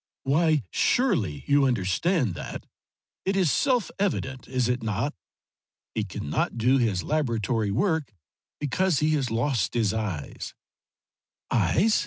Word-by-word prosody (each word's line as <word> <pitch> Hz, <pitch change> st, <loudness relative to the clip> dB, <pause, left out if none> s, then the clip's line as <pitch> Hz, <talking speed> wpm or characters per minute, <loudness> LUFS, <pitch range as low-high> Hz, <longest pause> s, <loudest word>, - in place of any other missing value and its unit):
"Why 155 Hz, 0 st, +2 dB
surely 105 Hz, -, +1 dB
you 145 Hz, 0 st, +4 dB
understand 120 Hz, -, +1 dB
that. -, -, -7 dB, 0.6 s
It 195 Hz, +1 st, 0 dB
is 185 Hz, -7 st, +3 dB
self 250 Hz, -, +1 dB
evident, 135 Hz, -, -1 dB
is 125 Hz, -2 st, 0 dB
it 125 Hz, 0 st, 0 dB
not? 110 Hz, +6 st, -1 dB, 0.8 s
He -, -, -1 dB
cannot -, -, -2 dB
do 125 Hz, +4 st, +3 dB
his 105 Hz, -7 st, +1 dB
laboratory 115 Hz, -7 st, 0 dB
work 155 Hz, -, 0 dB, 0.5 s
because 170 Hz, +4 st, +1 dB
he 155 Hz, +3 st, +2 dB
has 140 Hz, -5 st, +1 dB
lost 120 Hz, 0 st, 0 dB
his 110 Hz, -4 st, +2 dB
eyes." 100 Hz, -10 st, -4 dB
130 Hz, 120 wpm, -26 LUFS, 110-155 Hz, 0.8 s, you